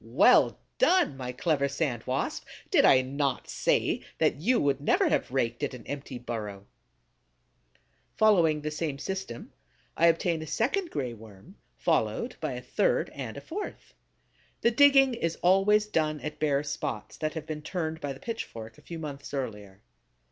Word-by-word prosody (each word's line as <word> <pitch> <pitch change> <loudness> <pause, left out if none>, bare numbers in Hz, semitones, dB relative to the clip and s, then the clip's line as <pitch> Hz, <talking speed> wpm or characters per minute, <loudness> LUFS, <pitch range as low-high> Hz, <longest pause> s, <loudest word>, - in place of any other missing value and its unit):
Well - - +5 0.2
done, 370 - +4
my 125 -2 -5
clever 140 +2 0
Sand 140 -5 -2
Wasp! 130 +2 -2 0.3
Did - - +5
I 130 0 +6
not 135 0 -2
say - - +1 0.2
that - - +2
you 230 - +2
would 140 -1 +1
never 145 - +3
have - - 0
raked 120 -2 -1
at 140 -3 -2
an 120 - -12
empty 140 -2 -6
burrow? 105 -5 -6 1.5
Following 170 -8 +4
the 150 +1 -3
same 150 -2 -3
system, 190 -6 -6 0.4
I 170 - +4
obtain 165 0 +2
a 160 - -7
second 335 - 0
Gray 125 - -3
Worm, 110 - -14 0.2
followed - - 0
by - - -3
a - - -6
third - - +1
and - - -6
a - - -6
fourth. 400 +5 -7 0.7
The 235 - +4
digging 270 +1 +6
is 165 -8 -2
always 195 +4 +4
done 155 -7 0
at 150 - -6
bare 145 -2 +1
spots 140 -6 -4
that 155 +1 -3
have 160 -1 -5
been 155 -1 -5
turned 160 -1 -3
by 145 - -3
the 135 - -8
pitchfork 115 - -6
a - - -18
few 170 - -8
months 145 -3 -6
earlier. 105 -7 -6
150 Hz, 165 wpm, -28 LUFS, 130-185 Hz, 1.5 s, I